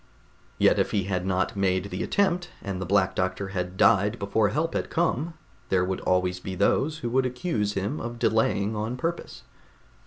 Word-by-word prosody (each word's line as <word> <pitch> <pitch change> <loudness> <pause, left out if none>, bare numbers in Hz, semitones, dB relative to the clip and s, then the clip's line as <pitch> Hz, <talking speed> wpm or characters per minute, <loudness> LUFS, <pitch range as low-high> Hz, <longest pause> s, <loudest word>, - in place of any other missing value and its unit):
Yet - - +4
if - - +2
he 100 -2 0
had 90 -1 -2
not 95 +1 0
made 95 0 0
the 90 - -3
attempt 180 -3 +1
and 95 -2 -4
the 95 - -3
Black 95 -1 +3
Doctor 95 +1 -2
had 90 -1 -4
died 105 +5 +4
before 100 +1 +1
help 165 +3 -1
had - - -2
come, 165 -1 0 0.3
there 90 -1 +2
would 95 0 -3
always 90 0 +1
be 95 +1 -6
those 135 - +2
who - - 0
would 130 +1 +2
accuse 125 - -2
him 100 +10 -2
of 120 0 -5
delaying 110 -2 +1
on 110 +4 -3
purpose. 165 +5 -4
100 Hz, 185 wpm, -26 LUFS, 95-125 Hz, 0.3 s, Yet